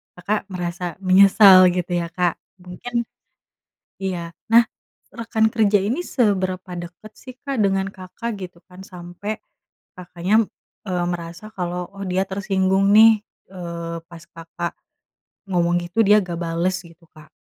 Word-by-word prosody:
Kakak 200 +3 -2
merasa 180 0 -4 0.2
menyesal 190 0 +7
gitu 180 0 -3
ya 170 - -4
Kak? 175 -1 0 0.3
Mungkin, 235 +7 -4 1.0
iya, 170 -3 -3 0.2
nah, 235 0 +8 0.5
rekan 225 -1 0
kerja 210 -2 +3
ini 240 - -1
seberapa 190 -6 0
dekat 175 +5 -10
sih 255 -1 -11
Kak, 275 -2 -3
dengan 195 0 +1
Kakak? 200 +5 -6
Gitu 180 -2 -8
kan. 180 +1 -14
Sampai 180 +4 -7 0.6
Kakaknya, 180 +5 +1 0.4
eee, 180 -1 -1
merasa 175 +4 -6
kalau, 180 -1 -3
"Oh, 195 0 -6
dia 190 +1 +1
tersinggung 195 0 +1
nih", 220 -1 +7 0.3
eee, 170 -2 -6
pas 170 -1 -12
Kakak 170 +1 -6 0.8
ngomong 175 -1 +2
gitu, 180 +6 -2
dia 210 +1 +6
nggak 170 -2 -5
bales 170 +2 -1
gitu 170 0 -17
Kak? 155 -2 -16
185 Hz, 135 wpm, -21 LUFS, 175-205 Hz, 1.0 s, nah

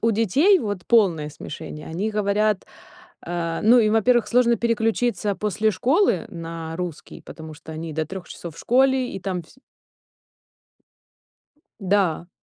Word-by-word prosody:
у 230 - +2
детей 275 - +4
вот 205 - -4
полное 180 -10 +3
смешение, 150 0 -8
они 195 +7 -2
говорят, 210 0 +1 0.6
э, 170 -1 -2
ну, 240 +3 +7
им, 215 -1 +2
во-первых, 225 -1 +3
сложно 235 +1 +4
переключиться 225 -2 0
после 210 +2 0
школы 250 - +2
на 165 -1 -7
русский, 180 -4 -6
потому 160 -1 -10
что 160 +1 -11
они 160 0 -6
до 160 0 -2
3 190 +1 -8
часов 170 -3 -8
в - - -15
школе, 260 +1 +2
и - - -5
там 185 -2 -3
всь 160 - -21 2.2
Да. 190 -4 +1
200 Hz, 140 wpm, -23 LUFS, 165-230 Hz, 2.2 s, ну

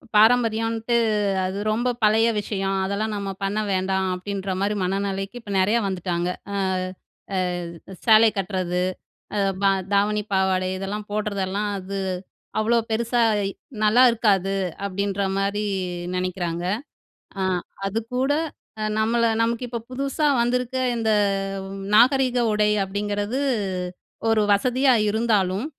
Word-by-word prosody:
"பாரம்பரியம்ன்ட்டு 225 +1 +3 0.5
அது 190 +2 -3
ரொம்ப 240 +3 0
பழைய 220 +2 +5
விஷயம். 195 -2 -2
அதெல்லாம் 210 +2 -2
நம்ம 200 -1 -4
பண்ண 200 +2 0
வேண்டாம்." 190 0 0
அப்படின்ற 195 0 -4
மாரி 205 +1 +1
மனநிலைக்கு 195 +4 -2
இப்ப 205 -3 -6
நெறைய 210 +5 +3
வந்துட்டாங்க. 180 -2 -2 0.3
அ - - -2 0.8
அ - - +1 0.7
"சேலைய 220 -1 +7
கட்டுறது, 180 -2 -1 0.5
அ - - +2 0.2
ப - - +4 0.3
தாவணி, 210 +1 +2
பாவாடை 190 -1 +2
இதெல்லாம் 205 +2 -4
போடுறதெல்லாம், 205 -1 -1
அது 195 +1 -5 0.6
அவ்வளோ 230 +2 +3
பெருசா 235 +2 +1 0.3
இ - - -5 0.3
நல்லா 240 +4 +6
இருக்காது." 195 -4 +2 0.3
அப்படின்ற 200 +1 -2 0.2
மாரி 200 +2 0 0.5
நெனைக்கிறாங்க. 180 -2 -2 0.8
அ - - +1 0.5
அதுக்கூட 250 +6 -1 0.5
அ - - -1 0.2
நம்மளை 230 +1 +2
"நமக்கு 235 +2 0
இப்ப 235 -1 -4
புதுசா 275 +3 -1 0.2
வந்திருக்க 250 +1 -1 0.2
இந்த 220 -1 +1 0.8
நாகரீக 255 +1 +4
உடை 210 0 +3
அப்படிங்கிறது 205 +4 -2 0.9
ஒரு 225 -1 +3
வசதியா 255 +6 +3 0.2
இருந்தாலும், 210 -1 +1
210 Hz, 115 wpm, -23 LUFS, 195-230 Hz, 0.9 s, சேலைய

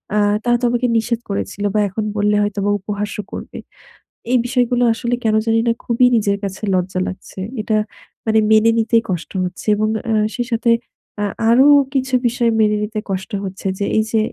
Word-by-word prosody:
আ - - +2 0.3
তারা 240 0 +3
তো - - +1
আমাকে 245 +1 +1
নিষেধ 225 +1 -1
করেছিল 100 - -3
বা - - +3
এখন 215 +3 -3
বললে 210 0 +2
হয়তোবা 205 0 -1
উপহাসও 210 +1 -4
করবে। - - -7 0.7
এই 255 - +5
বিষয়গুলো 245 -1 +1
আসলে 235 +1 -2
কেন 220 -1 +2
জানিনা 225 +1 +2
খুবই 240 +1 +3
নিজের 200 -2 +1
কাছে 195 -1 -5
লজ্জা 185 0 -1
লাগছে। 185 +1 -8 0.2
এটা 215 0 0 0.5
মানে 220 -1 +3
মেনে 220 +1 +5
নিতেই 230 0 +2
কষ্ট 175 -3 -3
হচ্ছে। 180 +4 -7
এবং 215 +1 0 0.2
আ - - +2 0.2
সেই 245 -2 -2
সাথে 230 0 +2 0.5
আ - - +1 0.2
আরো 250 +4 +6 0.3
কিছু 265 -1 -1
বিষয় 235 0 +1
মেনে 210 0 +3
নিতে 215 +1 -3
কষ্ট 190 0 -4
হচ্ছে 190 +1 -6
যে 200 - 0
এই 220 - +3
যে 225 - +2
220 Hz, 180 wpm, -19 LUFS, 205-235 Hz, 0.7 s, আরো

